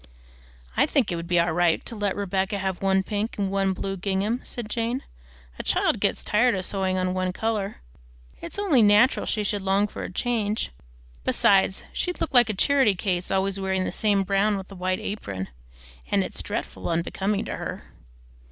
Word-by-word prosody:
"I - - +4
think 255 -9 +1
it - - -1
would 170 0 -5
be 175 -1 +3
all 170 -1 +2
right 175 -1 +2
to 230 - -3
let 205 -2 -1
Rebecca 195 0 -1
have 190 -2 -3
one 190 0 +3
pink 210 +3 -3
and 195 -2 -1
one 195 -1 +1
blue 195 +1 -3
gingham," 200 +5 -1
said 240 -3 -5
Jane. 235 +4 -2 0.6
"A - - -3
child - - +2
gets - - 0
tired 235 +2 +3
of 185 0 -2
sewing 190 -2 -1
on 185 0 0
one 185 0 0
color. 210 0 -2 0.6
It's 170 - -7
only 365 - +3
natural 210 +4 +5
she 210 - 0
should 205 0 -1
long 195 +2 +2
for - - -8
a - - -5
change; 220 - -1 0.5
besides 195 -1 +3
she'd 360 -1 -2
look 315 - -2
like 240 -3 +6
a 215 - -1
charity 265 -1 +3
child 180 -1 -2
always 195 0 0
wearing 190 -1 0
the - - -2
same 205 -2 +2
brown 200 +2 +2
with 190 +1 -8
a - - -8
white 185 0 -1
apron. 100 - -5 0.6
And - - +2
it's - - -4
dreadful - - -4
unbecoming 190 +4 -1
to - - -4
her!" - - -5
195 Hz, 190 wpm, -25 LUFS, 185-215 Hz, 0.6 s, like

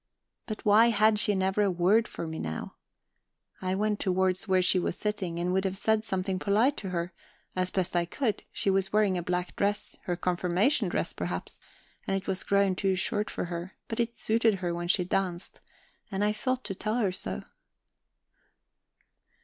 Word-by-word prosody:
But 215 - -6
why 215 +3 +7
had 215 -1 +4
she 210 -1 +3
never 190 +2 +1
a 200 - +3
word 190 +6 +3
for - - -6
me 160 0 -5
now? 80 0 -4 0.9
I 185 0 0
went 210 +1 0
towards 185 +1 +1
where 185 -1 +3
she 180 +1 +4
was 175 - -1
sitting, 195 -5 -2
and 175 +1 0
would 190 0 +2
have 190 -1 -2
said 220 +1 +2
something 190 -3 -1
polite 220 +9 +3
to 195 - -4
her, 175 0 -3 0.4
as 185 0 +1
best 185 -1 -1
I 175 0 +3
could; 215 +4 -1
she 195 - +1
was 190 0 +1
wearing 210 -3 +3
a 175 - -1
black 180 +1 -2
dress, 205 +1 -1
her 175 - 0
confirmation 180 - +1
dress, 170 - -1
perhaps, 90 0 -4 0.5
and 195 - +1
it 195 - -6
was 190 -1 0
grown 200 -1 +3
too 190 +1 +1
short 205 +3 0
for - - -3
her, 175 +1 -5
but 225 - -4
it 235 0 -1
suited 225 0 +2
her 180 -2 -2
when 175 0 -3
she 180 +1 +3
danced, 180 0 -2 0.5
and 195 0 -1
I 210 - +3
thought 255 +4 -1
to 195 - -4
tell 215 +3 -2
her 215 -6 +1
so. 185 - -4
190 Hz, 190 wpm, -29 LUFS, 180-210 Hz, 0.9 s, why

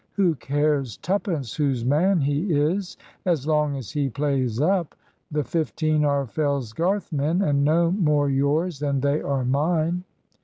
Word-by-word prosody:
Who 185 -5 +2
cares 140 -3 -1
twopence 175 - -2
whose 135 -6 0
man 165 +7 +3
he 145 +7 0
is, 165 +6 0 0.3
as 165 -7 0
long 150 -2 +1
as 130 -6 -7
he 145 -2 -1
plays 135 -4 -1
up? 175 +2 +1 0.3
The 150 -1 -1
fifteen 155 +2 0
are 140 -1 +1
Fellsgarth 145 - -1
men, 155 +6 +1
and 140 -4 +2
no 165 +3 +3
more 150 -7 +2
yours 140 +4 0
than 140 -2 -1
they 140 +2 +1
are 135 -2 -1
mine." 160 +6 0
150 Hz, 150 wpm, -24 LUFS, 140-165 Hz, 0.3 s, man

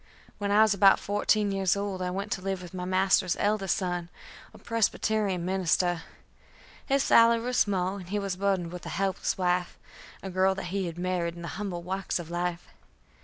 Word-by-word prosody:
When 205 -1 -2
I 210 +2 +6
was 215 -1 +3
about 195 0 +5
fourteen 205 0 +1
years 195 -1 +1
old 200 -2 -3
I 180 - -1
went 195 +3 -4
to 190 - -2
live 190 -1 -3
with 175 - -11
my 180 -1 -4
master's 185 0 +2
eldest 205 -2 +1
son, 175 -3 -3 0.4
a - - -15
Presbyterian 215 -4 0
minister. 180 -2 +1 0.9
His 275 0 +2
salary 230 0 +5
was 250 0 -1
small, 190 -1 +1
and 180 -3 -10
he 205 - -1
was 195 -2 -2
burdened 190 -3 -1
with 180 0 -8
a - - -4
helpless 195 -1 -1
wife, 180 -1 0 0.5
a 190 - -5
girl 190 +1 +2
that 195 - -5
he 195 -2 -1
had 170 0 -7
married 175 -1 -2
in 170 - -9
the 170 - -5
humble 190 -5 -5
walks 190 +2 -2
of 170 -2 -7
life. 175 0 -3
190 Hz, 195 wpm, -28 LUFS, 180-200 Hz, 0.9 s, I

